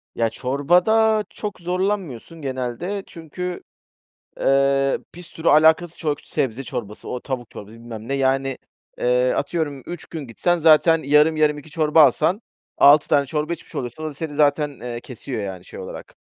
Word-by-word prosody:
Ya 115 -1 +1
çorbada 180 - +2
çok 210 -2 -6
zorlanmıyorsun 180 - -3
genelde 135 +9 -4
çünkü, 175 +2 -6 0.8
eee, 135 0 +2
pir 175 - -11
sürü 165 -1 -6
alakasız 160 +3 +4
çok 150 -3 -2
sebze 130 +1 -2
çorbası, 120 -6 -6
o 125 - -3
tavuk 125 -2 -5
çorbası 105 +2 -10
bilmem 115 -1 -9
ne, 135 - -2
yani, 135 0 0 0.4
eee, - - +2
atıyorum 150 - -2
3 175 -3 -7
gün 155 -5 -7
gitsen, 175 +9 0
zaten 160 0 +5
yarım 150 +3 +4
yarım 150 -1 +2
2 150 +2 -11
çorba 155 0 +3
alsan 165 +8 +2 0.4
6 145 +1 +6
tane 145 -2 +3
çorba 150 +4 -2
içmiş 170 - -11
oluyorsun, 125 +5 -5
o - - -2
da - - -9
seni 150 0 -5
zaten, 145 -1 +1
eee, 120 -1 -5
kesiyor, 125 -1 -6
yani, 95 -2 -6
şey - - -10
olarak. 95 - -9
150 Hz, 160 wpm, -22 LUFS, 130-170 Hz, 0.8 s, 6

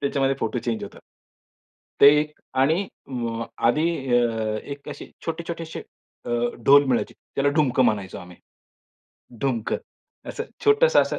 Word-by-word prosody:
त्याच्यामध्ये 135 -1 +1
photo 115 +2 -1
change 115 -2 -3
होतात. - - -12 1.0
ते 140 - +10 0.5
आणि 160 +8 +2 0.2
म 115 -3 -3 0.2
आधी 150 +6 +2 0.3
अ, 110 -2 0
एक 140 0 -8
असे - - -8 0.2
छोटे 165 0 -2
छोटेसे 165 -1 -5 0.4
अ, - - -5 0.3
ढोल 140 +1 +7
मिळायची. 130 -3 0 0.2
त्याला 140 +1 +3
ढुमक 135 -5 +2
म्हणायचो 100 -6 +1
आम्ही. 90 0 -12 1.0
ढुमकं, 120 -5 0 0.5
असं - - -4 0.2
छोटंसं 460 +3 +5
असं - - -3
135 Hz, 130 wpm, -24 LUFS, 115-150 Hz, 1.0 s, ते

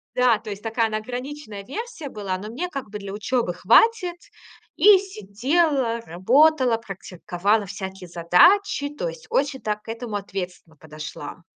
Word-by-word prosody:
Да, 250 -3 +4
то 215 -1 -9
есть 200 0 -6
такая 225 0 0
она, 215 - -2
ограниченная 245 -1 -6
версия 350 - -6
была, 195 -4 -4
но 210 +3 -8
мне, 280 +11 -3
как 275 -8 -6
бы, 210 0 -6
для 200 -1 -7
учёбы 215 -2 -1
хватит. 360 - +4 0.6
И 410 -1 +8
сидела, 260 - 0
работала, 245 - +3
практиковала 195 0 -2
всякие 190 -1 -7
задачи, 285 - +4
то 295 +12 -4
есть - - -11
очень 275 -1 0
так 210 0 -3
к - - -13
этому 225 -1 -5
ответственно 185 -4 -6
подошла. 155 +2 -9
225 Hz, 150 wpm, -23 LUFS, 195-285 Hz, 0.6 s, И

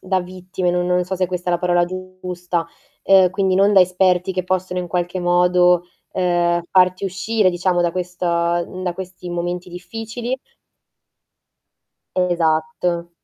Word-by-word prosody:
da 185 0 0
vittime, 185 0 -3
no 180 0 0
non 180 0 +1
so 190 +1 -3
se 185 0 +1
questa 180 0 -3
è - - +1
la 175 - +1
parola 175 -1 +2
giusta, 180 -1 -4 0.4
ehm, 190 -2 +6
quindi 190 0 0
non 200 +1 +4
da 190 - +8
esperti 180 0 +2
che 185 0 -1
possono 185 0 -1
in 175 - -5
qualche 175 +1 -2
modo, 180 0 +4 0.3
ehm, 175 -1 +1
farti 185 +1 +3
uscire 195 +2 +1
diciamo 175 0 0
da 170 -1 0
questo 180 0 -4
da 175 +1 -1
questi 185 -1 -8
momenti 175 +1 -3
difficili. 225 +7 -5 1.8
Esatto. 170 -1 0
180 Hz, 145 wpm, -20 LUFS, 175-185 Hz, 1.8 s, da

